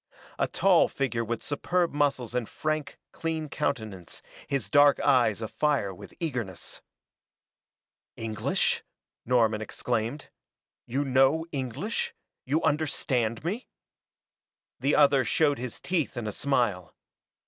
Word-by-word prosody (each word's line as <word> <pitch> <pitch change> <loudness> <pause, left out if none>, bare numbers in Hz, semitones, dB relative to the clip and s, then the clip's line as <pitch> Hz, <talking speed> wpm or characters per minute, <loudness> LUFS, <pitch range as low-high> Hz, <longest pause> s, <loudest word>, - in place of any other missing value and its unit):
A - - +2
tall - - +4
figure 125 -4 -1
with 115 0 -3
superb 175 +3 0
muscles 140 -5 0
and 125 -3 -1
frank, 155 -1 -2
clean 160 -2 -3
countenance, 110 - -3 0.2
his 135 -8 -1
dark 145 +5 +6
eyes 120 -6 +3
afire 130 -3 0
with 90 - -12
eagerness. 125 - -4 1.4
"English?" 110 -3 0 0.5
Norman 115 -3 +3
exclaimed. 120 +5 -3 0.6
"You 135 +4 -1
know 135 +5 +3
English 140 - -3 0.3
you 145 +5 +1
understand 135 -7 0
me?" 205 +10 -3 1.1
The 140 +2 +2
other 140 -2 +5
showed 145 +3 +2
his 125 -1 -5
teeth 165 -7 -1
in 120 - -3
a 105 - -2
smile. 120 - 0
135 Hz, 115 wpm, -28 LUFS, 115-150 Hz, 1.4 s, dark